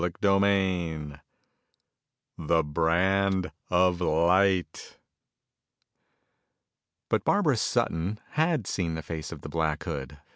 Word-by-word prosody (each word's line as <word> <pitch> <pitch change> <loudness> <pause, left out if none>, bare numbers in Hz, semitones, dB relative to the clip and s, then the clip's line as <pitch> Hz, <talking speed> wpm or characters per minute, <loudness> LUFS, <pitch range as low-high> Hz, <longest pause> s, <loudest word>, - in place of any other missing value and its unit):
CHAPTER 95 +3 +1
V 90 -7 0 1.3
The 80 +1 +1
Brand 90 +5 +1 0.2
Of 90 0 +2
Light 90 +1 +1 2.1
But - - 0
Barbara - - +2
Sutton 90 +6 -1
had 155 - +1
seen 85 -4 -2
the 80 - -6
face 80 -1 -6
of 80 -4 -8
the 75 - -8
Black 80 -1 -1
Hood. 70 +1 -6
85 Hz, 100 wpm, -27 LUFS, 80-95 Hz, 2.1 s, Of